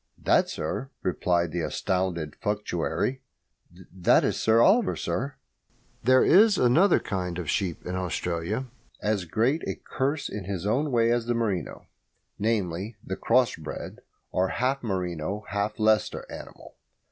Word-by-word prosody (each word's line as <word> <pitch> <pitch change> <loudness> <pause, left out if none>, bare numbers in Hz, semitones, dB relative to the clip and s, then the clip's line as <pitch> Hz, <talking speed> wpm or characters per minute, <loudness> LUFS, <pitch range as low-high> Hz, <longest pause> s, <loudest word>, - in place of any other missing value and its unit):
"That, - - +3
sir," 135 - -4
replied 85 -2 +1
the 85 +1 -2
astounded 85 -3 -2
functionary 105 +5 -2 0.7
"that 90 - +4
is - - +1
Sir 110 +1 +3
Oliver, 195 - +4
sir!" 140 +4 -3 0.7
There 130 +2 +5
is 205 +2 +6
another 165 +11 +4
kind 90 -3 -3
of 90 -3 -4
sheep 90 -5 -2
in 90 - -4
Australia, 90 +5 -2 0.4
as 105 -3 0
great 115 - +1
a - - -2
curse 140 +3 -2
in 100 -3 -6
his 95 -1 -4
own 130 +9 +1
way 115 -2 +3
as 120 -1 0
the 120 - +1
merino 105 -6 -2 0.5
namely, 105 -1 -1
the 95 - -4
cross 125 +4 +2
bred, 80 -1 -7 0.3
or 95 +1 +1
half 130 +7 0
merino 95 -1 -3
half 105 +1 -2
Leicester 110 -1 +2
animal. - - -11
105 Hz, 140 wpm, -27 LUFS, 90-125 Hz, 0.7 s, is